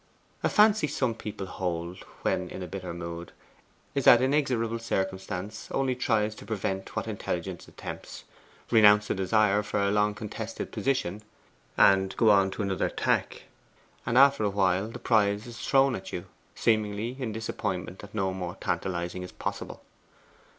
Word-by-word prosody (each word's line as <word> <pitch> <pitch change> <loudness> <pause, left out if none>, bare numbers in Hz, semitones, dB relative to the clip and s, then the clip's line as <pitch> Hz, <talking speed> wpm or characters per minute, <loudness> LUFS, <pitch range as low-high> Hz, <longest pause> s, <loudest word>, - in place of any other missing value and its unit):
A - - +2
fancy 210 -5 +5
some 130 -5 0
people 105 -3 -6
hold, 90 -1 -4 0.2
when - - 0
in 95 - -6
a - - -5
bitter 90 0 -6
mood, 85 0 -7 0.6
is 140 - -1
that 120 - +9
inexorable 130 -4 +1
circumstance 95 -1 -3
only 135 -2 0
tries 110 -3 +1
to - - -12
prevent 95 -3 -3
what - - -2
intelligence - - -4
attempts. - - -8 0.5
Renounce 105 -2 +6
a - - +3
desire 105 +1 +2
for 105 0 -2
a 100 0 +2
long 105 0 +2
contested 110 +1 -6
position, 105 -7 -1 0.6
and 95 0 +4
go 110 -2 +5
on 95 -1 +4
another 100 -3 0
tack, - - -1 0.6
and 115 +1 0
after 140 -2 +6
a 105 - +2
while 95 0 +1
the 115 - -7
prize 105 -2 +2
is 120 -1 -9
thrown 135 +1 +3
at 95 0 -8
you, 90 - -5 0.3
seemingly 110 +1 0
in 125 -4 -2
disappointment 105 -4 -4
that 100 +1 -11
no 95 -3 0
more 90 -2 -5
tantalizing 90 -1 -2
is 90 - -7
possible. - - -5
105 Hz, 155 wpm, -28 LUFS, 95-115 Hz, 0.6 s, that